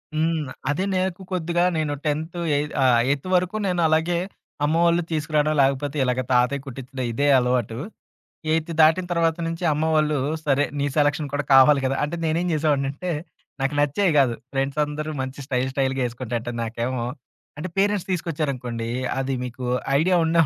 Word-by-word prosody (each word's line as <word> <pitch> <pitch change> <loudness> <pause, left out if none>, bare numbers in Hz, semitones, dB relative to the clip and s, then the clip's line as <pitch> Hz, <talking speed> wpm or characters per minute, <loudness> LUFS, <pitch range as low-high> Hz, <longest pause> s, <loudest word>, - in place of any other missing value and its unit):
హ్మ్. 155 -3 0 0.2
అదే 150 +6 0
నాకు 185 0 -1
కొద్దిగా 175 -1 0
నేను 150 -2 0
10థ్ 155 +3 -2 0.2
ఏయి 145 +1 +1 0.2
ఆహ్, 125 -3 +5
ఎయిత్ 140 +4 -1
వరకు 180 +3 +1
నేనలాగే 170 -1 +2 0.5
అమ్మ 155 - +1
వళ్ళు 170 +1 +3
తీసుకురావడం 155 -1 +1
లేకపోతే 140 +2 0
ఇలాగ 125 0 0
తాతయ్య 125 +3 +2
కుట్టించడం 130 0 -6
ఇదే 140 +5 0
అలవాటు. 125 -2 0 0.8
ఎయిత్ 165 +1 0
దాటిన 160 +4 +5
తర్వాత 165 -1 +2
నుంచి 165 +2 -4
అమ్మ 150 +2 0
వాళ్ళు, 155 -1 +2 0.3
సరే 145 0 +3
నీ 140 - 0
సెలక్షన్ 145 0 +2
కూడా 145 0 -1
కావాలి 135 +2 +7
కదా! 135 +1 +1
అంటే 150 +4 -3
నేనేం 165 +3 0
చేసావాడినింటే, 145 +2 0 0.5
నాకు 135 +2 0
నచ్చేయి 160 +6 +2
కాదు. 130 -4 +4 0.2
ఫ్రెండ్సందరూ 150 +3 -1
మంచి 130 +2 -5
స్టైల్, 130 -1 0
స్టైల్‌గా 135 -1 0
వేసుకుంటంట 120 -1 -4
నాకేమో, 120 +2 -2 0.5
అంటే 170 - -4
పేరెంట్స్ 200 -1 +1
తీసుకొచ్చారనుకోండి. 140 -9 -2 0.3
అది 135 0 -1
మీకు 125 +1 -6 0.3
ఐడియా 180 +4 +3
ఉండే 165 +1 +3
145 Hz, 150 wpm, -23 LUFS, 130-165 Hz, 0.8 s, కావాలి